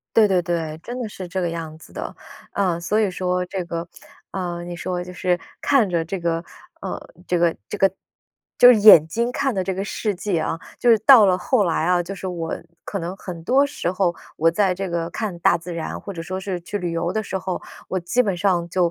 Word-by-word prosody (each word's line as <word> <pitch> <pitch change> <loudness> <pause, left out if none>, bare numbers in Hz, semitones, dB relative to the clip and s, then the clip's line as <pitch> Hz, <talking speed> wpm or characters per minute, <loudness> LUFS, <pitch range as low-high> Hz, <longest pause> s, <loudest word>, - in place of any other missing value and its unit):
对 220 -2 +7
对 185 -2 +2
对， 165 -3 -2
真 245 +1 -5
的 235 - -3
是 190 -3 -8
这 185 +2 -3
个 175 - 0
样 160 -2 -6
子 160 - -16
的。 - - -6 0.4
啊， 180 -4 0
所 210 +6 0
以 210 - +2
说 180 0 -1
这 185 0 -4
个， 170 0 -5 0.4
啊， 175 -2 -3
你 175 0 -6
说 180 0 -3
就 180 0 -9
是 180 0 0 0.2
看 260 -8 +3
着 170 -2 0
这 180 +4 -4
个 170 -1 -1 0.4
呃， - - -4 0.3
这 175 - +1
个 170 -1 +3
这 - - -4
个 195 0 +4 0.7
就 245 - +9
是 220 - +2
眼 200 -7 +9
睛 235 +8 -1
看 265 0 -1
的 190 - 0
这 190 0 -2
个 195 - -3
世 210 0 -2
界 190 -1 -1
啊， 160 - -2 0.2
就 245 - +1
是 225 - +6
到 225 -1 +8
了 185 -1 +4
后 205 +4 +2
来 165 -2 0
啊， 180 +1 +3
就 185 +3 -6
是 190 - -6
我 170 -3 -3 0.3
可 200 - -4
能 175 +1 -4
很 170 -3 -8
多 270 +8 +4
时 230 -11 -3
候， 180 -2 +1 0.2
我 165 +2 +4
在 185 +1 +2
这 195 +1 -4
个 170 -1 -2
看 205 -6 -4
大 170 - +3
自 170 +1 -7
然， 165 - -4
或 200 - -7
者 165 - -5
说 185 +2 -4
是 190 -2 -3
去 205 - -4
旅 175 -3 -3
游 170 +1 -1
的 220 - -1
时 195 -2 -4
候， 185 -1 -3 0.3
我 185 - -1
基 180 +9 +2
本 200 -5 0
上 175 -2 +1
就， 175 -1 +2
180 Hz, 255 characters per minute, -22 LUFS, 170-200 Hz, 0.7 s, 就